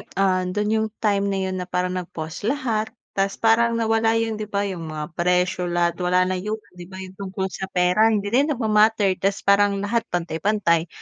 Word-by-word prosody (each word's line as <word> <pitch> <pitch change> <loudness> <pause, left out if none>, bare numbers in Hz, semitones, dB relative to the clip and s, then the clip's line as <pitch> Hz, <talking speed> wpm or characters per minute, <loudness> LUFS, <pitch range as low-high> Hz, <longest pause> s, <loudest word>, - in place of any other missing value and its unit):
'yung, 200 - -12
ah, 190 -1 +2
don 210 +3 -1
'yung 220 0 +1 0.2
time 200 -1 +2
na 195 - -1
'yon 185 -1 -3
na 180 - -6
parang 180 0 -1
nag-pause 170 +1 -5
lahat, 235 -6 -1 0.2
tapos 195 0 -1
parang 230 +1 +3
nawala 225 0 +2
'yung 225 -1 -1
'di 210 - -4
ba, 200 0 -1
'yung 180 -5 -5
mga 155 +1 -6
pressure 180 +1 +1
lahat 175 0 0
wala 180 +1 +3
na 185 0 -1
'yon 210 +3 -3 0.2
'di 175 -1 -11
ba, 190 - -10
'yung 190 0 -8
tungkol 190 0 -5
sa 190 - -5
pera 180 +4 +3
hindi 210 -2 0
na 240 - +3
'yan 290 - +1
nagma-matter 215 -3 +3
tapos 195 0 0
parang 200 0 +4
lahat 230 +3 +1
pantay-pantay 170 0 0
195 Hz, 205 wpm, -23 LUFS, 180-215 Hz, 0.2 s, parang